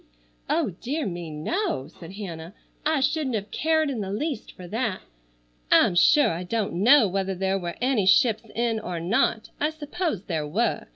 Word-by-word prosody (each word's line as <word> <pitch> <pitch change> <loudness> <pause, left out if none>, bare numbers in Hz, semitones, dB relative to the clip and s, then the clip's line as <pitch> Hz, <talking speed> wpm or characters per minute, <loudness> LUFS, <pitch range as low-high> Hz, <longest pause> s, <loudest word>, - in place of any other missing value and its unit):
"Oh, 315 -10 +1
dear 290 +4 -2
me. 175 -3 -5
No!" 155 - -2
said 170 +2 -12
Hannah. 175 -2 -7 0.3
"I 310 -3 +2
shouldn't 280 -2 0
have 205 -1 -4
cared 315 0 +1
in 260 -6 -2
the 195 - -4
least 270 +3 -3
for 180 - -11
that. 220 -1 -2 0.7
I'm - - +6
sure 285 - +5
I 165 +1 -3
don't 210 +3 -2
know 230 +7 +6
whether 190 0 -2
there 190 +1 0
were 175 -2 -5
any 245 -6 +1
ships 225 0 +4
in 230 -1 0
or 180 -5 -4
not. 215 +5 0
I 300 - +2
suppose 315 - -3
there 160 -6 -3
were. 215 +11 -1
215 Hz, 175 wpm, -25 LUFS, 180-275 Hz, 0.7 s, I'm